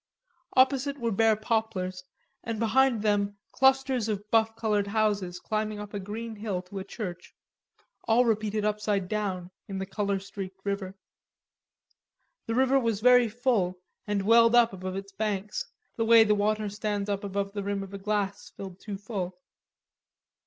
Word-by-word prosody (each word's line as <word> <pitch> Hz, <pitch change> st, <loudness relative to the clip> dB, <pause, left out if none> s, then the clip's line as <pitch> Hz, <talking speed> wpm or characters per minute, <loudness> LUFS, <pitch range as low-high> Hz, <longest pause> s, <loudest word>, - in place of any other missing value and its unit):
Opposite 270 Hz, +2 st, +3 dB
were 230 Hz, -1 st, 0 dB
bare 220 Hz, +2 st, +4 dB
poplars 210 Hz, -4 st, -2 dB, 0.4 s
and 230 Hz, -1 st, -3 dB
behind 235 Hz, 0 st, +3 dB
them 205 Hz, -1 st, +1 dB
clusters 265 Hz, -3 st, +3 dB
of 210 Hz, 0 st, -4 dB
buff 225 Hz, -1 st, +3 dB
colored 210 Hz, -3 st, 0 dB
houses 205 Hz, -4 st, 0 dB
climbing 215 Hz, 0 st, -2 dB
up 210 Hz, 0 st, -8 dB
a 205 Hz, -, -2 dB
green 220 Hz, +3 st, -6 dB
hill 205 Hz, -4 st, -3 dB
to 195 Hz, +2 st, -7 dB
a -, -, -4 dB
church, 185 Hz, -4 st, -7 dB, 0.7 s
all 235 Hz, +2 st, +4 dB
repeated 215 Hz, -2 st, 0 dB
upside 210 Hz, -2 st, 0 dB
down 185 Hz, -4 st, -3 dB, 0.2 s
in 195 Hz, -, -5 dB
the 190 Hz, -, -3 dB
color 200 Hz, 0 st, -1 dB
streaked 195 Hz, -1 st, -7 dB
river. 200 Hz, -1 st, -3 dB, 1.5 s
The 225 Hz, -, -1 dB
river 265 Hz, +1 st, +4 dB
was 230 Hz, -5 st, 0 dB
very 245 Hz, 0 st, +6 dB
full, 215 Hz, -6 st, 0 dB, 0.3 s
and 205 Hz, -1 st, 0 dB
welled 230 Hz, +2 st, +6 dB
up 235 Hz, -3 st, +5 dB
above 185 Hz, 0 st, -5 dB
its 195 Hz, 0 st, -6 dB
banks, 210 Hz, -, -2 dB, 0.3 s
the 225 Hz, -, +1 dB
way 230 Hz, 0 st, +8 dB
the 210 Hz, -1 st, +3 dB
water 210 Hz, +1 st, +1 dB
stands 205 Hz, 0 st, -2 dB
up 200 Hz, -1 st, -2 dB
above 200 Hz, 0 st, -2 dB
the 205 Hz, -, -3 dB
rim 200 Hz, 0 st, -2 dB
of 195 Hz, 0 st, -10 dB
a 200 Hz, -, -5 dB
glass 205 Hz, -1 st, -2 dB
filled 190 Hz, -2 st, -8 dB
too 205 Hz, -2 st, -6 dB
full. 190 Hz, -3 st, -5 dB
210 Hz, 160 wpm, -28 LUFS, 195-225 Hz, 1.5 s, way